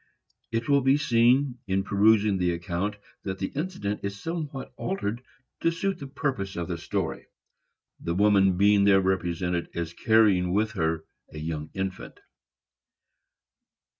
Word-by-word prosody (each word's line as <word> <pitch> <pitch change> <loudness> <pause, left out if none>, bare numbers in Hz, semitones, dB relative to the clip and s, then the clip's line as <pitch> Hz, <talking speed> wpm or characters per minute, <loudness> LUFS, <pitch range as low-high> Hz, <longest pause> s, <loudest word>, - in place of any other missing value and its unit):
It 115 0 -1
will 140 -1 +4
be 135 +2 +4
seen, 125 0 +3
in 95 0 +1
perusing 100 0 +3
the 90 -1 +1
account, 90 +4 -3 0.3
that 95 -1 -4
the 95 - -3
incident 140 - -3
is 100 0 -5
somewhat 155 -4 -5
altered 120 - -3 0.4
to 165 - +2
suit 185 +2 -2
the 140 - -7
purpose 130 -9 -3
of 85 -1 -3
the 85 -2 -3
story, - - -3 0.7
the 85 0 -3
woman 95 -2 +4
being 100 +1 +5
there 100 -1 +6
represented 90 -2 -1
as 85 -1 -3
carrying 100 -5 +3
with 110 +2 +1
her 80 -5 -1 0.3
a - - -10
young 75 0 -4
infant. 95 -1 -5
100 Hz, 140 wpm, -26 LUFS, 90-120 Hz, 0.7 s, there